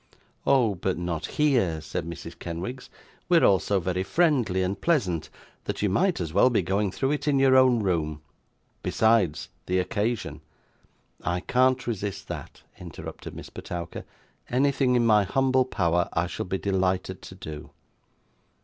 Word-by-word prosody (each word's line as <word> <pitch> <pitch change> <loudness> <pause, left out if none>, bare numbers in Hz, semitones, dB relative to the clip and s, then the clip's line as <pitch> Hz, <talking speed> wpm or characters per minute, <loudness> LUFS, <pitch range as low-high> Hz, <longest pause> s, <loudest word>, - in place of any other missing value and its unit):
'Oh, 125 -6 +4
but 95 0 -2
not 85 -2 -3
here!' 120 - +1
said 80 +1 -4
Mrs. 85 -2 -8
Kenwigs. 90 +10 -6 0.4
'We 175 - +6
are - - +5
all 95 -2 +5
so 100 -1 0
very 90 +1 -1
friendly 120 - +2
and 95 +2 -3
pleasant, 100 - +1 0.4
that - - -3
you 105 - +3
might 180 - +2
as 80 -3 -4
well 125 - +5
be 115 -6 +1
going 100 +3 0
through 135 +8 -1
it 150 0 -2
in 145 -2 +3
your 135 -1 +5
own 130 -4 +5
room; 80 -5 -1 0.6
besides, 110 -9 +2 0.2
the 90 - +1
occasion 110 +4 -2 0.4
' - - -35
'I 90 +1 -1
can't 130 +4 +2
resist 100 -4 -4
that,' - - -8 0.2
interrupted 85 -4 -9
Miss - - -9
Petowker; 85 -1 -6 0.5
'anything 130 0 +2
in 120 -1 +3
my 105 -2 +5
humble 130 +5 +2
power 90 -7 0
I 85 - +1
shall 90 - -5
be 95 - -1
delighted 95 -1 -1
to 95 - -10
do. 75 -5 -8
100 Hz, 160 wpm, -26 LUFS, 90-130 Hz, 0.6 s, We